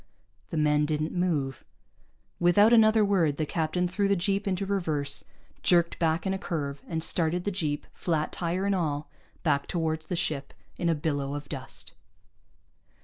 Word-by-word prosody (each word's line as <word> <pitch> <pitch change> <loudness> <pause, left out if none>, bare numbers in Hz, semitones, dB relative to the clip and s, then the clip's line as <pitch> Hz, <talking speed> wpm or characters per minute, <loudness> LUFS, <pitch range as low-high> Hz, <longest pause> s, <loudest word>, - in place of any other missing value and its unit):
The 165 - -3
men 150 -1 +3
didn't 155 +1 -1
move. 155 -8 -1 0.8
Without 205 +6 +5
another 220 -1 +6
word, 170 -8 +2
the 155 - 0
captain 165 +3 0
threw 200 +3 0
the 200 - +3
jeep 195 +2 0
into 195 0 0
reverse, 155 -8 -1 0.4
jerked 170 -2 +3
back 160 +1 +1
in 190 - +1
a 190 - -3
curve, 145 -6 -3
and 160 -1 -2
started 170 +1 +1
the 205 - -1
jeep, 155 -6 -2
flat 160 -3 -1
tire 180 +2 -2
and 200 - +2
all, 155 -5 -2 0.3
back 140 -4 +1
toward 160 -2 -1
the 160 +3 -4
ship 150 -5 -2 0.2
in 170 - +1
a 165 - +3
billow 145 -2 -2
of 145 0 -6
dust. 135 -2 -8
165 Hz, 165 wpm, -28 LUFS, 150-185 Hz, 0.8 s, another